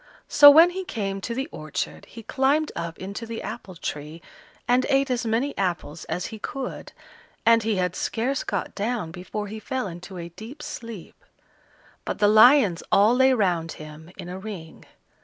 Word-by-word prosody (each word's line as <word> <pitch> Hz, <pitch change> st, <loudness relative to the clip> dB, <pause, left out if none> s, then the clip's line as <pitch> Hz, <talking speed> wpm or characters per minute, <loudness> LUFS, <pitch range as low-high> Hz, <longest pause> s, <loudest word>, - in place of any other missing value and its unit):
So 290 Hz, -1 st, +10 dB
when 325 Hz, +5 st, +8 dB
he 380 Hz, +1 st, -4 dB
came 195 Hz, -, -4 dB
to 230 Hz, +4 st, -4 dB
the 265 Hz, +3 st, -2 dB
orchard, 155 Hz, -1 st, -5 dB
he 230 Hz, -, -11 dB
climbed 280 Hz, +6 st, +1 dB
up 170 Hz, -1 st, -5 dB
into 200 Hz, +5 st, -6 dB
the 230 Hz, 0 st, -6 dB
apple 210 Hz, -4 st, -7 dB
tree 150 Hz, 0 st, -6 dB, 0.5 s
and 250 Hz, +1 st, +3 dB
ate 275 Hz, -1 st, +2 dB
as 245 Hz, -1 st, -1 dB
many 240 Hz, +6 st, 0 dB
apples 175 Hz, -4 st, -3 dB
as 180 Hz, -, -3 dB
he 220 Hz, -, -7 dB
could, 265 Hz, +4 st, -6 dB, 0.5 s
and 230 Hz, 0 st, +6 dB
he 220 Hz, -1 st, 0 dB
had 180 Hz, -1 st, -1 dB
scarce 255 Hz, +4 st, -1 dB
got -, -, -3 dB
down 210 Hz, -5 st, -2 dB
before 190 Hz, +4 st, -5 dB
he 215 Hz, +2 st, -7 dB
fell 260 Hz, +4 st, -3 dB
into 180 Hz, +1 st, -8 dB
a 170 Hz, 0 st, -6 dB
deep 220 Hz, -, -10 dB
sleep; 230 Hz, -7 st, -9 dB, 0.8 s
but -, -, -4 dB
the 205 Hz, -, +4 dB
lions 215 Hz, -, +6 dB
all 210 Hz, +4 st, +5 dB
lay 260 Hz, +1 st, +5 dB
round 180 Hz, -9 st, +1 dB
him 155 Hz, +1 st, -11 dB
in 180 Hz, -2 st, -8 dB
a 180 Hz, +1 st, -6 dB
ring. 190 Hz, -6 st, -9 dB
215 Hz, 175 wpm, -24 LUFS, 180-250 Hz, 0.8 s, So